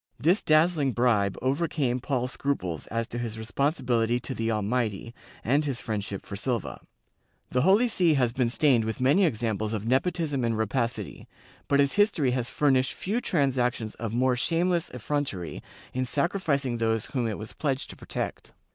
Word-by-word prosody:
^ - - -68 0.2
This 175 +7 +4
dazzling 155 -3 +3
bribe 110 -5 +2
overcame 135 -2 0
Paul's 125 -1 -1
scruples 90 - -2
as 115 +1 -2
to 120 - -4
his 115 -2 -4
responsibility 120 -1 0
to 130 - -4
the 115 -2 -2
Almighty 110 0 -1 0.3
and 140 +6 +2
his 140 -5 -2
friendship 100 -3 -4
for 100 - -6
Silva. 120 +2 -3 0.7
The 125 - +2
Holy 200 - +5
See 175 -8 +3
has 125 -4 +2
been 125 -2 +1
stained 130 -2 +3
with 110 +2 -3
many 145 +10 +4
examples 110 - -1
of 110 -1 -3
nepotism 140 +2 0
and 115 -1 0
rapacity, 115 +2 -2 0.4
but 140 - +3
its 140 +6 +2
history 205 - +3
has 125 -1 -1
furnished 130 -3 +2
few 215 +6 -2
transactions 125 - 0
of 115 -2 -5
more 125 +2 +2
shameless 170 +5 0
effrontery 125 - -3 0.3
in 130 0 -1
sacri 170 +9 0
ficing 140 -8 0
those 110 -1 +1
whom 125 -5 -2
it 110 - -3
was 110 - -8
pledged 135 -2 -2
to - - -11
protect. - - -5
125 Hz, 170 wpm, -27 LUFS, 115-145 Hz, 0.7 s, Holy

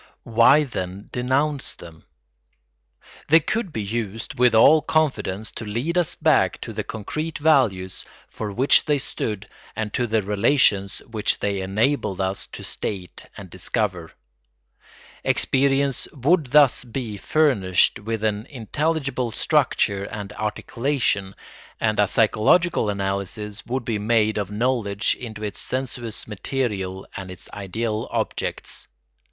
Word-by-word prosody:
Why, 120 +6 +5
then, 95 -7 -5
denounce 135 +4 0
them? 80 -2 -13 1.2
They 160 +2 +7
could 205 +4 -2
be 110 -7 -3
used 110 +1 -4
with 125 -2 +5
all 155 +8 +7
confidence 135 -10 0
to - - -7
lead 120 +11 -2
us 175 -3 +1
back - - +2
to - - -6
the - - -3
concrete 155 +9 -4
values 120 -12 +2 0.2
for 105 -2 -5
which 130 +7 +4
they 150 -1 +2
stood 110 -6 -4 0.3
and 110 -2 -3
to 120 - 0
the 110 -1 +1
relations 100 -1 +2
which 110 -2 0
they 100 -1 -1
enabled 100 +1 0
us 95 0 -1
to - - -9
state 95 -4 -5
and 95 -4 -10
discover. 95 -3 -2 1.1
Experience 135 0 +2
would 150 +2 +2
thus 145 -1 +5
be 120 -3 -5
furnished 100 - +2
with 110 +1 -4
an 105 0 -1
intelligible 140 0 -2
structure 100 -2 +1
and 105 0 -7
articulation, 110 -2 -1 0.4
and 110 -1 +1
a 105 - +5
psychological 110 - +3
analysis 100 +2 -3
would 125 0 -2
be 110 -3 -1
made 110 0 +2
of 100 -2 -3
knowledge 110 -1 0
into 110 -3 -8
its 105 -1 -4
sensuous 125 -4 -3
material 100 -4 -3
and 95 -1 -6
its 90 - -9
ideal 105 +2 -3
objects. - - -3
110 Hz, 130 wpm, -23 LUFS, 100-135 Hz, 1.2 s, They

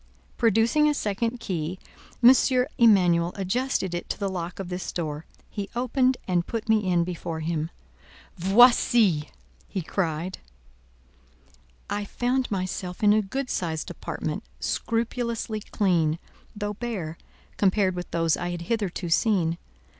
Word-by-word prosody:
Producing 230 +7 +3
a 295 - +1
second 230 +2 -1
key, 180 -5 -3 0.5
M. 245 +2 +10 0.5
Emanuel 180 -7 +5
adjusted 195 -1 -1
it 175 - -4
to - - -2
the 200 -1 -1
lock 175 -1 -4
of 190 -2 -5
this 180 0 -4
door. 155 -2 -4 0.2
He 200 -1 -5
opened, 255 +1 +2 0.3
put 230 -2 -4
me 215 -4 +2
in 170 -1 +3
before 170 -2 -4
him. 160 0 -2 0.7
"Voici!" 200 -3 +5 0.4
he 190 - -4
cried. 170 0 -2 1.5
I 205 0 -2
found 250 +4 -1
myself 185 -1 -3
in 205 0 +6
a 215 - +4
good 255 +6 -4
sized 160 -3 -2
apartment, - - -4 0.2
scrupulously 230 -1 -2
clean, 175 -7 +1 0.4
though 205 0 -3
bare, 200 -8 -4 0.4
compared 195 -1 +3
with 180 0 -6
those 165 -1 +1
I 175 0 -3
had 175 -1 -4
hitherto 195 -3 -2
seen. 170 -2 +2
195 Hz, 130 wpm, -26 LUFS, 175-230 Hz, 1.5 s, M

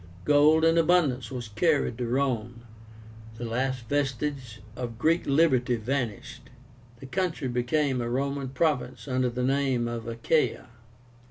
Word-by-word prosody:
Gold 150 +2 +5
in 165 +1 +4
abundance 160 -7 +2
was 125 -4 -6
carried 140 0 +1
to 120 - -2
Rome. 120 -2 -1 0.8
The 120 - -5
last 125 +1 -2
vestige 135 -3 -2 0.2
of 120 -3 -5
Greek 165 +7 +1
liberty 135 -4 +3
vanished. 120 -1 -4 0.5
The 135 - -10
country 160 -1 -2
became 125 +2 0
a 120 - -3
Roman 140 +1 -2
province 145 0 -1
under 130 -1 +1
the 125 +1 -3
name 135 -2 +1
of 120 -1 -5
ACHAIA. 115 +6 0
130 Hz, 135 wpm, -27 LUFS, 120-145 Hz, 0.8 s, Gold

